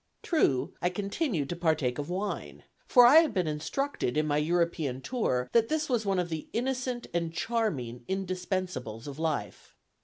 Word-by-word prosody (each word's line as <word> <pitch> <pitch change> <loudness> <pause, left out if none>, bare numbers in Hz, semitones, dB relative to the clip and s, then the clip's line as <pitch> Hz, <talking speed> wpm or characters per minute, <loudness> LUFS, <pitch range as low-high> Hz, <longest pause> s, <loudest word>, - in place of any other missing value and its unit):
True, 145 - +1
I 180 - +2
continued 200 - -2
to 175 - -2
partake 155 -7 0
of 145 - -4
wine, 195 +3 -4 0.2
for 245 -2 +7
I 265 +6 +8
had 325 -2 +5
been 185 -2 +2
instructed, 155 - -2
in 155 - +2
my 145 -1 +1
European 160 -4 0
tour, 130 - -1
that 230 -1 +4
this 310 -1 0
was 230 -5 0
one 195 -1 +2
of 175 -1 0
the 160 -2 -4
innocent 250 0 -2
and 170 -1 -1
charming 160 - -2
indispensables 185 - -3
of 145 0 -7
life. 150 - -3
175 Hz, 165 wpm, -29 LUFS, 150-230 Hz, 0.2 s, I